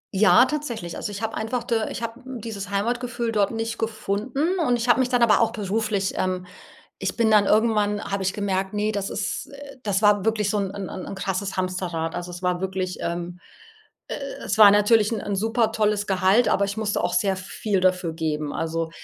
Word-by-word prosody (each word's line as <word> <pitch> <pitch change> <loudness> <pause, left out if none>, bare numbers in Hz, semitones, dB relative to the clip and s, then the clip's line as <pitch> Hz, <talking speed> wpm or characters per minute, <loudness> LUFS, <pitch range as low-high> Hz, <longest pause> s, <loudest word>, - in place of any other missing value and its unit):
Ja, 195 +4 +6
tatsächlich. 255 - -4
Also, - - -4
ich 205 +2 -6
habe 225 - -2
einfach 235 +2 -2
da 225 -2 -1
ich 235 - -6
habe 230 +2 -5
dieses 225 -6 -6
Heimatgefühl 235 +3 -1
dort 205 -2 +2
nicht 225 0 -4
gefunden 230 - -1
und 250 -7 +2
ich 235 +1 -2
habe 240 - +5
mich 255 -1 +2
dann 245 -2 +3
aber 225 -1 +5
auch 225 -1 +3
beruflich, 210 -2 -1
ähm 185 -1 -1 0.5
ich - - -3
bin 230 -2 +3
dann 210 -1 +6
irgendwann 210 -1 +2
habe 200 0 -3
ich 190 0 0
gemerkt, 190 -2 -2
ne, 210 +1 0
das 200 -2 -3
ist - - -3 0.3
das 200 -2 0
war 205 -2 +4
wirklich 215 -2 +1
so 210 - 0
'n 195 -2 -1
'n 200 -2 -5
'n 185 - -6
n - - -6
krasses 195 0 -3
Hamsterrad. 180 -3 -2
Also, 175 0 -5
es 175 +1 -9
war 180 0 0
wirklich, 185 -1 -2
ähm 175 +1 -4 0.7
e - - -2 0.3
es 210 - -1
war 210 -2 +10
natürlich 210 +1 +4
'n 215 - -1
'n 200 -1 -3
supertolles 215 -1 +1
Gehalt, 195 +5 +3
aber 200 - +2
ich 200 +2 -4
musste 210 -2 -1
auch - - 0
sehr 195 -3 +1
viel 190 +1 -2
dafür 180 -3 +1
geben. 155 -2 -2
Also 165 0 -2
205 Hz, 205 wpm, -24 LUFS, 185-225 Hz, 0.7 s, war